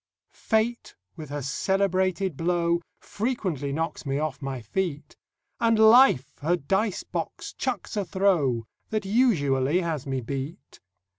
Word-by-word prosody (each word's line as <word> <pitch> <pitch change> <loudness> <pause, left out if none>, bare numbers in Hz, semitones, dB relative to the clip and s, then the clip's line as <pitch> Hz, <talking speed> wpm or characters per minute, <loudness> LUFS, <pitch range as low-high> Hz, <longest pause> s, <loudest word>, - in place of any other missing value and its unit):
Fate 225 +1 -1 0.2
with 155 -3 -8
her 145 -1 -4
celebrated 190 +3 0
blow 170 +1 +1 0.2
Frequently 195 - -2
knocks 160 +3 -3
me 140 -2 -1
off 150 -2 -3
my 135 -2 -4
feet; 150 - -3 0.4
And 230 -1 +3
Life 220 - +6
her 165 +5 +2
dice 195 +6 -1
box - - -5
chucks - - -3
a 205 - 0
throw 170 - +1 0.2
That 215 -2 -2
usually 175 - +2
has 160 -6 -3
me 135 -1 -1
beat. 140 - -6
170 Hz, 130 wpm, -26 LUFS, 140-200 Hz, 0.4 s, Life